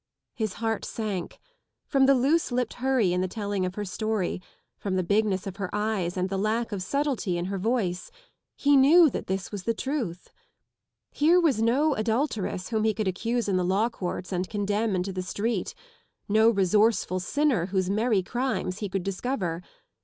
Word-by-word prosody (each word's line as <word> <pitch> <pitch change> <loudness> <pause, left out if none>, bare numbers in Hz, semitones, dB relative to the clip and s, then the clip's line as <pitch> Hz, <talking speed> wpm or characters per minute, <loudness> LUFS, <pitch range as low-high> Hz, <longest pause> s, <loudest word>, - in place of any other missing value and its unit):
His 220 -5 -2
heart 225 0 -2
sank. 205 -6 -4 0.5
From 270 -2 +3
the 275 - +6
loose 285 +6 +2
dipped 245 -2 -1
hurry 255 -9 +2
in 180 - +1
the 185 - 0
telling 200 -1 -2
of 180 - -6
her 210 - -3
story, 205 -1 -2 0.3
from 195 -2 -3
the 185 - +1
bigness 200 0 +1
of 195 -1 -6
her 195 -3 -3
eyes 210 -4 -1
and 185 0 0
the 195 0 -2
lack 225 +3 0
of 200 -2 -3
subtlety 265 -5 -1
in 175 - -2
her 195 +1 -3
voice, 195 -4 -1 0.5
he 285 0 +3
knew 300 +3 +7
that - - -5
this 190 -1 -3
was 205 -2 -5
the 230 - 0
$ruth. 240 - -3 0.8
Here 330 +5 +4
was 290 -11 +2
no 275 +7 +3
adulteress 220 -5 -1
whom 220 -2 0
he 220 -1 +2
could 215 -1 -1
accuse 230 +5 -1
in 195 -2 +1
the 180 - +1
law 195 +6 +2
courts 185 -4 -5
and 180 0 -2
condemn 205 0 0
into 185 +1 -2
the 185 - -3
street, 200 +2 -2 0.5
no 220 +2 +5
resourceful 205 -1 +2
sinner 235 - +1
whose 190 -1 0
merry 215 -2 +2
crimes 240 -4 -2
he 205 - -3
could 190 -1 -2
discover. 195 -4 -2
210 Hz, 185 wpm, -26 LUFS, 185-235 Hz, 0.8 s, knew